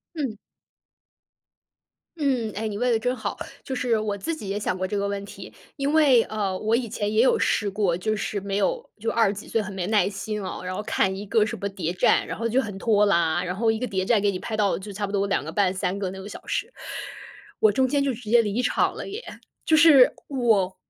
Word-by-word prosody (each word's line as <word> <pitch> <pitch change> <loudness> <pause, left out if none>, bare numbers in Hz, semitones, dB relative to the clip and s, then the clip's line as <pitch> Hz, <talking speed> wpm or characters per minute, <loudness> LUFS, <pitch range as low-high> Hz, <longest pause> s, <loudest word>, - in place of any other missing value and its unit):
嗯。 265 -9 -3 1.8
嗯， 260 -8 0
诶， 220 +2 -2
你 205 - -5
问 250 +2 +1
得 230 - +3
真 250 +3 -1
好， - - -4 0.3
就 265 - -5
是 245 -2 +1
我 210 -1 -2
自 330 +11 -2
己 215 -11 -8
也 200 +1 -1
想 205 -3 -1
过 185 0 -2
这 205 - -2
个 200 - 0
问 200 0 -3
题。 195 -1 -10 0.2
因 280 0 -1
为， 285 -7 +5
呃， 200 -3 -2
我 220 +3 0
以 235 0 0
前 205 0 -2
也 215 +1 +4
有 260 - +4
试 205 -2 +1
过， 195 -4 0
就 215 +4 -1
是 205 0 -3
没 195 0 -3
有， - - 0
就 225 +2 -4
20 225 -4 +2
几 205 - -9
岁 225 - 0
很 205 0 -7
没 185 -2 -3
耐 205 -2 +3
心 210 +1 -4
哦， 190 - -5
然 185 0 -4
后 200 - -3
看 200 -3 0
一 195 +2 -6
个 215 +1 +3
什 220 - -4
么 200 - -1
谍 180 -4 -3
战， 180 - +3
然 - - -5
后 230 +1 -1
就 245 +4 +2
很 210 -6 -5
拖 210 0 +3
拉。 170 -2 +2
然 180 0 -3
后 225 +4 +2
一 220 - 0
个 250 - -2
谍 190 -4 -1
战 215 +2 +3
给 200 0 +2
你 185 - -4
拍 215 +3 -4
到 205 -2 +2
就 205 +2 -8
差 205 +1 -3
不 200 - -7
多 200 -1 +1
2 195 - 0
个 - - -6
半、 195 -3 +2
3 185 0 -2
个 195 -2 -3
那 190 +1 -8
个 195 - -8
小 210 - -10
时， 470 - -2 0.9
我 215 - +6
中 260 +6 +2
间 280 +2 +1
就 275 -1 +1
直 230 -2 -9
接 235 0 +6
离 215 +3 -1
场 250 - +1
了 - - -6
耶。 410 +4 -6 0.4
就 315 - +4
是 295 -5 +7
我 220 -9 +1
210 Hz, 260 characters per minute, -25 LUFS, 195-240 Hz, 1.8 s, 是